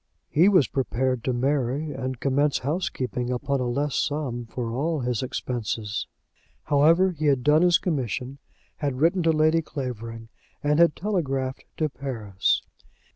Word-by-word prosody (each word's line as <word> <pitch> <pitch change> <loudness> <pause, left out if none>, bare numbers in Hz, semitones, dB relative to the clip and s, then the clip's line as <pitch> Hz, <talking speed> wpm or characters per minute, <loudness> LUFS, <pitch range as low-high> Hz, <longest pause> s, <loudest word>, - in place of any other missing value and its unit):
He 170 +6 +5
was 180 - +5
prepared 130 -2 -1
to 130 - +1
marry 135 +3 0
and 130 -2 -4
commence 140 +1 +2
housekeeping 130 -5 -2
upon 135 +2 -1
a 125 - -1
less 140 +3 -1
sum 125 -6 -2
for 115 0 -4
all 155 +4 -1
his 125 -2 -1
expenses. 115 -4 -3 0.6
However, 165 +6 +4
he 155 -3 -2
had 135 -3 +2
done 150 +3 +5
his 175 -1 +5
commission, 135 - -3 0.4
had 140 -3 -2
written 170 +5 +3
to 165 -1 +3
Lady 155 +1 +3
Clavering, 115 -6 -6 0.3
and 150 +1 +2
had 170 -2 +5
telegraphed 135 -10 -2
to 155 - +1
Paris. 115 -9 -1
135 Hz, 145 wpm, -25 LUFS, 125-155 Hz, 0.6 s, He